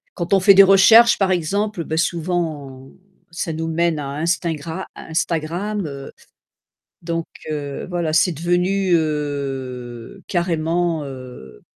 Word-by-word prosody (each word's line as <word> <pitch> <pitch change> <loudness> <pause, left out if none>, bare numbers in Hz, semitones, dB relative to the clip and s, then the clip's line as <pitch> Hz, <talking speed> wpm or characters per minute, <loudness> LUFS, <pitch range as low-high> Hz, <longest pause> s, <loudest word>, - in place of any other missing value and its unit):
Quand 170 +2 -2
on 195 - +5
fait 200 +2 +7
des 195 - +9
recherches 210 +5 +7
par 195 -2 +2
exemple, 190 +2 -1
ben 160 - -3
souvent 155 -6 -3 0.4
ça 170 -1 -4
nous 160 +1 -3
mène 165 -1 0
à 145 - -4
Instingra 165 +1 -2
Instagram, 170 +5 -2
heu, 140 -1 -8 0.9
donc 165 -1 -2 0.3
heu, 145 -2 -5
voilà. 170 -3 -2
C'est 175 +3 +3
devenu, 180 +4 0
heu, 140 -3 -4
carrément, 170 -2 0
heu 125 - -10
165 Hz, 125 wpm, -20 LUFS, 145-180 Hz, 0.9 s, des